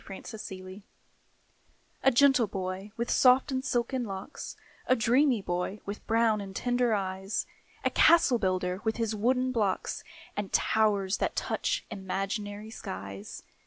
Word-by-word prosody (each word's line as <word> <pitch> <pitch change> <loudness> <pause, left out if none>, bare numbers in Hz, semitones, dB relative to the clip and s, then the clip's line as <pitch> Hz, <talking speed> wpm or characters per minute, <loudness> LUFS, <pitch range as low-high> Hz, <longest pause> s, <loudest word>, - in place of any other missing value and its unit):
THE - - -22
CASTLE 220 +3 -9 0.2
BUILDER 185 +2 -10 1.2
A - - +6
gentle 270 -2 +5
boy, 190 +1 -4
with 235 0 -1
soft 255 +2 +5
and 260 0 -1
silken 250 0 0
locks 195 +4 -6 0.3
A 255 - +5
dreamy 245 0 +3
boy, 180 +4 -2
with 200 +1 -7
brown 225 -2 +3
and 195 -1 -8
tender 245 -1 +1
eyes, 190 0 -2 0.4
A - - +3
castle 315 -7 +5
builder, 185 -1 0
with 220 0 0
his 225 -2 0
wooden 255 +4 +1
blocks, 210 -6 -1 0.3
And 205 -2 -3
towers 205 -3 +2
that - - -1
touch - - -1
imaginary 205 +2 -4
skies. 100 - -7
215 Hz, 140 wpm, -29 LUFS, 190-245 Hz, 1.2 s, A